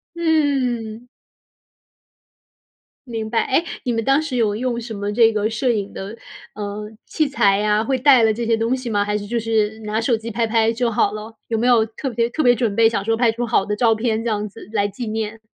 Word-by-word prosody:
嗯。 260 -9 0 2.0
明 225 -2 -4
白。 225 0 +1
诶， 270 +5 +2 0.2
你 250 - -1
们 225 - -1
当 270 +5 +3
时 315 -5 -4
有 220 -4 +1
用 240 0 -2
什 230 -1 -7
么 205 0 -3
这 225 0 +5
个 215 0 0
摄 230 +3 -1
影 205 -3 -2
的， 195 +3 -7 0.4
呃， 210 0 -5 0.2
器 310 -2 0
材 200 -8 +2
呀， 210 0 +2
会 265 +3 0
带 260 -2 +5
了 220 - +4
这 235 +2 -3
些 230 0 +2
东 230 +3 0
西 255 -2 -5
吗？ 205 -2 +1
还 210 0 -1
是 205 - -6
就 235 +3 -2
是 220 -1 0
拿 215 0 -2
手 235 +1 +2
机 225 +1 -7
拍 230 +1 0
拍 225 0 +2
就 235 0 0
好 205 -1 +1
了？ 215 +1 -7
有 225 - -1
没 230 - 0
有 235 -3 +5
特 225 +5 -5
别 235 -1 0
特 310 +6 -1
别 245 - +6
准 230 -4 -1
备 225 0 +5
想 210 -3 -2
说 225 - +2
拍 230 0 +3
出 240 +2 -3
好 220 -4 +1
的 210 - -2
照 225 0 +3
片 220 0 -1
这 235 - -1
样 210 -1 -1
子 215 +1 -13
来 205 -1 +1
纪 220 +4 -6
念？ 220 0 -3
225 Hz, 245 characters per minute, -20 LUFS, 215-240 Hz, 2.0 s, 别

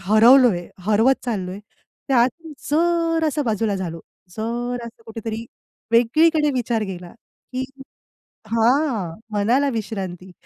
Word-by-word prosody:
हरवलोय, 220 -2 +5 0.2
हरवत 225 +5 +3
चाललोय. 195 -6 -3 0.5
त्यात 250 -2 +4 0.4
जरांसा 330 -1 +1
बाजूला 220 -4 0
झालो. 170 -3 -5 0.4
जरंसा 235 +1 -4
कुठेतरी 225 0 -5 0.5
वेगळीकडे 300 +6 +4
विचार 235 -3 0
गेला, 175 -1 -8 0.4
की 255 +1 -2 0.9
हां. 230 - +1
मनाला 240 +8 +2
विश्रांती, 190 -4 -5
230 Hz, 90 wpm, -22 LUFS, 205-265 Hz, 0.9 s, हरवलोय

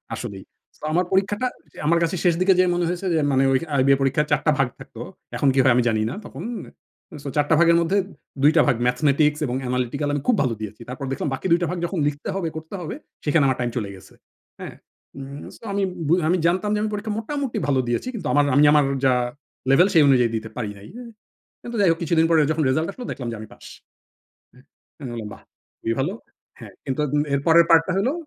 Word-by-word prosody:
আসলেই। - - -7 0.4
তো - - -6
আমার 180 +2 +2
পরীক্ষাটা 205 +5 +1 0.3
যে - - -19
আমার 170 +1 +4
কাছে 165 +2 -1
শেষ 175 -2 +4
দিকে 190 +1 +5
যেয়ে 185 0 +4
মনে 175 0 0
হয়েছে 180 +2 -4
যে 160 - +2
মানে 135 0 +3
ঐ - - +3 0.2
আইবিএ 135 0 +4
পরীক্ষার 135 +3 +1
৪ 150 - +3
টা 155 - +5
ভাগ 135 - +3
থাকতো। - - -11 0.3
এখন 140 - +1
কি 135 - +1
হয় 130 -2 +5
আমি 125 - +3
জানি 110 -1 0
না - - -5
তখন। - - -8 0.8
সো - - -7
৪ 150 -1 +3
টা - - +4
ভাগের 170 0 +5
মধ্যে 175 +4 +1 0.5
২ 150 - +7
টা - - +6
ভাগ 135 - +3
ম্যাথমেটিক্স 150 +3 +2
এবং 125 -2 -3
অ্যানালিটিকাল 125 +3 -2
আমি 145 - -1
খুব 245 - +4
ভালো 125 -3 0
দিয়েছি। 110 +1 -7
তারপর 130 +2 -5
দেখলাম 135 - -2
বাকি 135 - -6
২ 170 - +5
টা 175 - 0
ভাগ 180 - -3
যখন 175 +2 -4
লিখতে 145 0 -4
হবে, 190 -4 -2
করতে 160 +4 -8
হবে, 165 - -5 0.3
সেখানে 150 0 +3
আমার 130 -1 +1
টাইম 120 -1 0
চলে 105 -4 -3
গেছে। 95 - -16 0.5
হ্যাঁ। - - -8 0.4
উম 140 +1 -8
সো - - -24
আমি 200 0 0 0.2
বু 160 - +3 0.2
আমি 180 - +3
জানতাম 185 +4 0
যে - - 0
আমি 215 - -1
পরীক্ষা 210 +1 -3
মোটামুটি 275 +2 -3
ভালো 135 -2 +2
দিয়েছি। 120 - -1
কিন্তু 195 -10 -5
আমার 145 0 +4
আমি 145 - +5
আমার 150 -2 +5 0.2
যা 130 - +5 0.6
লেভেল, 175 +7 +6
সেই 160 -4 +6
অনুযায়ী 125 -4 +4
দিতে 110 0 -4
পারি 110 -4 -3
নাই। 100 - -13
উ - - -8 0.6
কিন্তু 240 0 -6
যাই 195 - +5
হোক 165 - -1
কিছুদিন 165 0 +2
পরে 165 -1 +4
যখন 160 0 0
রেজাল্ট 155 +5 +1
আসলো, 250 +4 -9
দেখলাম 125 - -6
যে - - -5
আমি 110 - -9
পাস। - - -17 1.3
অ্যা - - -16
আমি - - -5
বললাম, 110 -3 -6
"বাহ! - - -18 0.4
খুবই 115 - -1
ভালো।" 145 +8 -1 0.5
হ্যাঁ। - - -11
কিন্তু 135 +1 -2
উম 145 - +3
এর 140 - +1
পরের 170 +1 +6
পার্টটা 165 +2 +5
হলো 245 +8 +1
150 Hz, 230 wpm, -23 LUFS, 130-175 Hz, 1.3 s, ২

